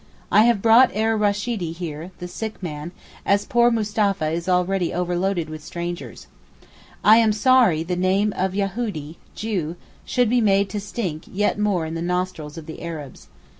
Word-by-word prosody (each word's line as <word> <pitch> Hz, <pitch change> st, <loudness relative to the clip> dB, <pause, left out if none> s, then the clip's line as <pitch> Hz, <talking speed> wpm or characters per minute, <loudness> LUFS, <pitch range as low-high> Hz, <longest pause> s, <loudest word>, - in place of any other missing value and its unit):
I 215 Hz, -, +6 dB
have 235 Hz, -4 st, +2 dB
brought 230 Hz, +3 st, +7 dB
Er 220 Hz, +1 st, +1 dB
Rasheedee 205 Hz, -4 st, -1 dB
here 165 Hz, -1 st, -6 dB
(the 180 Hz, -, -6 dB
sick 215 Hz, +2 st, -6 dB
man) 155 Hz, 0 st, -5 dB, 0.3 s
as 200 Hz, +1 st, +2 dB
poor 240 Hz, 0 st, +4 dB
Mustapha 210 Hz, -6 st, 0 dB
is 170 Hz, +2 st, -3 dB
already 180 Hz, 0 st, +1 dB
overloaded 180 Hz, 0 st, -1 dB
with 155 Hz, -1 st, -8 dB
strangers. 175 Hz, +2 st, -6 dB, 0.8 s
I 215 Hz, +2 st, +7 dB
am 225 Hz, -2 st, +4 dB
sorry 215 Hz, -7 st, +4 dB
the 180 Hz, +2 st, -2 dB
name 190 Hz, +3 st, +1 dB
of 190 Hz, 0 st, -1 dB
Yahoodee 195 Hz, -6 st, -3 dB, 0.2 s
(Jew) 185 Hz, -7 st, -3 dB, 0.3 s
should 250 Hz, -2 st, +1 dB
be 245 Hz, -1 st, +3 dB
made 200 Hz, -2 st, +3 dB
to 210 Hz, -, -2 dB
stink 195 Hz, -6 st, -4 dB
yet 205 Hz, +1 st, 0 dB
more 200 Hz, -6 st, +1 dB
in 160 Hz, -, -5 dB
the 165 Hz, -, -4 dB
nostrils 180 Hz, -3 st, -3 dB
of 160 Hz, -, -8 dB
the 160 Hz, -, -9 dB
Arabs. 155 Hz, -5 st, -8 dB
190 Hz, 170 wpm, -22 LUFS, 170-210 Hz, 0.8 s, brought